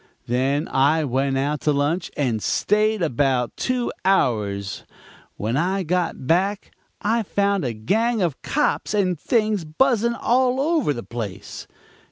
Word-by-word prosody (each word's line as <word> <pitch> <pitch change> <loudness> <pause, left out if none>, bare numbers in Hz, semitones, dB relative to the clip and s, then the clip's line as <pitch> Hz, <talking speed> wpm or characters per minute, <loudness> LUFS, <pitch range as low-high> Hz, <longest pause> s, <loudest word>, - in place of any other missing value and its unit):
"Then 135 +6 0
I 145 +4 +3
went 135 0 0
out 145 +2 -1
to 150 - +2
lunch 150 +5 0
and 120 -7 0
stayed 215 - +1
about 130 -4 0
two 250 -1 -1
hours; 105 - 0 0.5
when 110 +4 -2
I 185 +6 0
got 175 -4 -1
back 195 +7 0 0.3
I 225 +3 +2
found 200 -2 0
a 125 -3 -2
gang 220 - 0
of 170 -8 -1
cops 295 -6 0
and 185 -5 +1
things 215 -3 +1
buzzing 235 - +1
all 255 +2 +2
over 300 - +1
the 120 -4 -4
place. 115 -5 -7
165 Hz, 140 wpm, -22 LUFS, 135-215 Hz, 0.5 s, I